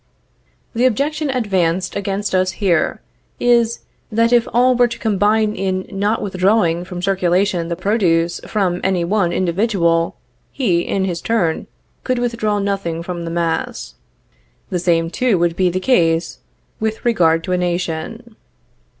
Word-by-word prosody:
The 245 +2 +3
objection 290 +5 -1
advanced 190 -8 0
against 200 0 -2
us 185 0 +1
here, 180 -5 0 0.4
is, 235 -1 +2 0.3
that 230 +2 +2
if 240 -1 +4
all 250 +2 +4
were 245 0 +4
to 235 0 -6
combine 215 0 +1
in 185 -1 -2
not 205 +3 -1
withdrawing 185 -3 +1
from 180 -1 -7
circulation 185 -2 +1
the 170 - -2
produce 175 -4 +1
from 185 -4 0
any 185 -2 +1
one 190 -1 +1
individual, 175 -2 +1 0.4
he, 185 -11 +1
in 190 +2 -1
his 175 -3 -3
turn, 180 -9 0 0.4
could 255 -1 0
withdraw 230 -3 -1
nothing 195 -5 -2
from 175 -1 -5
the - - -4
mass. 165 -1 -2 0.8
The 180 - 0
same, 165 -1 +1
too, 245 -3 +1
would 170 -1 +1
be 185 0 +2
the 185 +1 -2
case 170 -7 +1 0.4
with 220 +1 -3
regard 165 -8 +3
to 185 - -4
a 180 - +2
nation. 180 +6 -3
190 Hz, 145 wpm, -18 LUFS, 170-220 Hz, 0.8 s, if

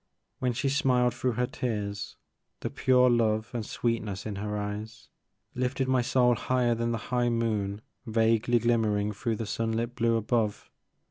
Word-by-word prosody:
When 125 -1 0
she 135 +4 -1
smiled 130 -4 +2
through 125 0 -1
her 125 +2 +1
tears, 105 -6 -4 0.5
the - - -3
pure 125 -1 +4
love 110 -2 +2
and 120 -2 -2
sweetness 110 -3 -2
in 105 -2 -4
her 105 +1 -3
eyes 105 +2 -6 0.4
lifted 130 +1 -1
my 130 -1 +3
soul 125 0 +3
higher 120 +1 +1
than 115 0 -1
the 115 - 0 0.2
high 120 -1 +2
moon 110 -3 -1 0.3
vaguely 115 +1 +3
glimmering 110 -3 +1
through 115 +2 -2
the 115 - -4
sun 115 +2 -2
lit 115 +2 -2
blue 115 -1 +2
above. 110 -1 -1
115 Hz, 160 wpm, -28 LUFS, 110-125 Hz, 0.5 s, pure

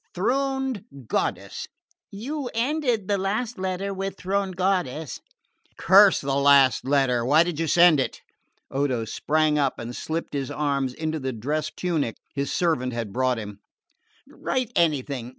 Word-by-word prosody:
'Throned 265 +2 -1 0.2
goddess' - - -2 0.3
" - - -69
"You 255 +6 -4
ended 245 -4 0
the 200 -1 +1
last 215 +5 -2
letter 190 +1 -2
with 195 0 -4
'throned 195 0 -2
goddess.'" 175 -6 -1 0.6
"Curse 195 +2 +6
the 135 0 -2
last 140 -2 +5
letter! 135 -3 +2
Why 150 +7 +5
did 170 -3 -4
you 165 - 0
send 170 -1 +6
it?" - - -2 0.5
Odo 135 -4 0
sprang 150 +6 +1
up 140 -2 0
and 120 +1 -6
slipped 165 +1 -4
his 140 -2 -2
arms 140 -3 -1
into 160 0 -3
the 130 -2 -3
dress 150 +7 -2
tunic 160 - -2 0.2
his 140 0 -2
servant 155 -8 0
had 115 -4 -4
brought 130 -1 +1
him. 105 -2 -7 0.7
"Write 255 -3 -3
anything. 140 -6 0
155 Hz, 150 wpm, -25 LUFS, 135-195 Hz, 0.7 s, Curse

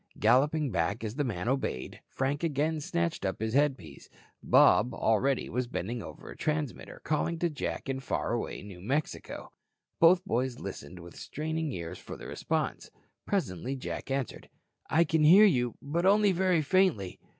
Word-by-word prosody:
Galloping 140 +5 +3
back, 95 +5 -1
as 110 -1 -3
the 145 +3 -1
man 105 -6 -3
obeyed, 130 - -2
Frank 140 +4 -2
again 155 0 0
snatched 85 -10 -2
up 95 -1 -2
his 110 +1 -2
headpiece. 135 - -1 0.3
Bob 120 +3 +5
already 120 +5 +1
was 125 0 -2
bending 120 0 -4
over - - -10
a - - -9
transmitter, 150 -4 -3
calling 155 +2 0
to 170 0 0
Jack 145 - -4
in 135 0 -2
faraway 120 -6 -3
New 95 -3 -10
Mexico. 140 +10 -3 0.5
Both 175 +2 +6
boys 125 +2 -1
listened 80 +6 -7
with 85 0 -11
straining 160 0 -3
ears 85 -3 -6
for - - -9
the - - -10
response. - - -2 0.4
Presently 135 - -1
Jack 130 - -6
answered: 135 -1 -3 0.4
"I 165 - +4
can 160 -1 +1
hear 185 +8 +8
you, 125 - +2
but 170 +6 0
only 205 0 +5
very 180 -3 +2
faintly. 150 - +1
135 Hz, 160 wpm, -29 LUFS, 110-160 Hz, 0.5 s, hear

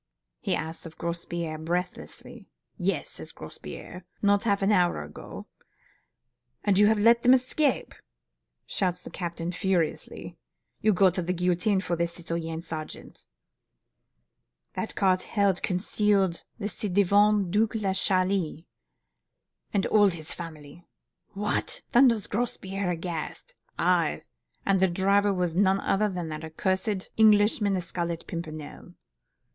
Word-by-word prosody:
he - - 0
asks 160 +2 -5
of 160 - -14
Grospierre, 170 -1 -4
breathlessly. 175 +2 -5 0.3
'Yes,' - - -1
says - - -9
Grospierre, 180 - -9 0.2
'not 205 +1 +2
half 200 -2 +2
an 195 - +3
hour 175 - +2
ago.' 75 +1 -9 1.2
'And 200 -1 +3
you 205 - +7
have 220 0 +3
let 230 +3 +5
them 250 +2 +7
escape,' 265 +3 0 0.7
shouts 180 -2 -1
the - - -10
captain 170 -1 -4
furiously. 180 -3 -2 0.4
'You'll 215 -2 +3
go 190 0 +5
to 180 - -2
the 180 +1 -1
guillotine 180 +3 +1
for 180 -2 -1
this, 170 0 -1
citoyen 165 -1 -4
sergeant! 155 -2 -8 1.5
that - - -4
cart 185 -2 +3
held 200 -3 +1
concealed 195 -1 +1
the 205 -3 -3
ci 210 +1 -4
devant 200 0 +3
Duc 215 +3 +2
de 205 -4 0
Chalis 185 -4 +1 1.1
and 200 -2 +1
all 210 -1 +5
his 165 -4 -4
family!' 160 -1 -9 0.5
'What!' 210 +1 -2
thunders 235 -5 +5
Grospierre, 195 -4 -2
aghast. 170 -2 -5 0.2
'Aye! - - +2 0.4
and 195 -1 +3
the 190 - +4
driver 200 +3 +3
was 180 -3 -1
none 190 +2 +3
other 210 +2 +1
than 175 -4 -4
that 155 +1 -7
cursed 190 +1 -1
Englishman, 210 -1 +4
the 185 - -1
Scarlet 170 -1 -3
Pimpernel. 155 -3 -7
185 Hz, 130 wpm, -27 LUFS, 170-205 Hz, 1.5 s, you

